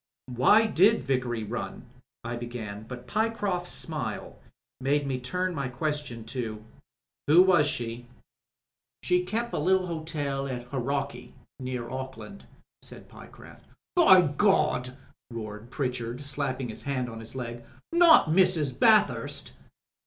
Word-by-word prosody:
"Why 205 - +5
did 220 +2 +4
Vickery 125 -4 -1
run," 120 +3 -5 0.4
I 120 +1 -4
began, 110 -3 -7
but 125 0 -8
Pyecroft's 205 -5 -1
smile 130 -10 -3 0.4
made 140 +2 +1
me 130 -2 -2
turn 180 +9 -2
my 140 -4 -2
question 140 -3 -4
to 110 -4 -5 0.6
"Who 165 +5 +7
was 175 -6 +4
she?" 120 -4 -4 1.0
"She 180 0 +2
kep' 230 +5 -3
a - - -1
little 185 +4 +2
hotel 150 -5 -3
at 125 -2 -4
Hauraki 140 +2 -3
— - - -20
^near 125 -2 -4
Auckland," 130 +9 -7 0.3
said - - -11
Pyecroft. - - -14 0.3
"By 190 - +7
Gawd 150 -5 +2
I" 130 - -14 0.3
roared 110 -1 -7
Pritchard, 125 -2 -3
slapping 135 -3 -2
his 110 - -7
hand 130 -3 -2
on 115 -1 -8
his 115 +3 -10
leg. 120 -2 -6 0.2
" - - -54
Not 340 -1 +7
Mrs. 160 -6 +2
Bathurst 215 -2 +3
135 Hz, 135 wpm, -27 LUFS, 120-180 Hz, 1.0 s, Who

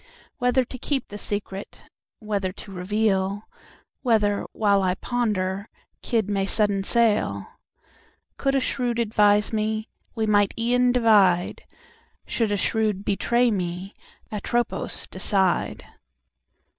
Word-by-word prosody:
Whether 250 +1 +3
to 255 - -8
keep 270 -1 -2
the 205 - -7
secret—Whether 205 0 -5
to 195 - -11
reveal—Whether, 205 +2 -1
while 200 -2 +2
I 185 -1 +1
ponderKidd 210 0 -2
may 195 -1 0
sudden 205 -2 +1
sail—Could 220 - -2
a - - +4
Shrewd 245 -2 -1
advise 210 -2 +3
meWe 215 0 -1 0.4
might 205 -2 +3
e'en 245 +2 +3
divide—Should 230 - 0
a 205 - +1
Shrewd 210 -1 0
betray 235 +4 +2
me—"Atropos" 195 +5 -3
decide! 190 -3 0
210 Hz, 90 wpm, -24 LUFS, 195-235 Hz, 0.4 s, a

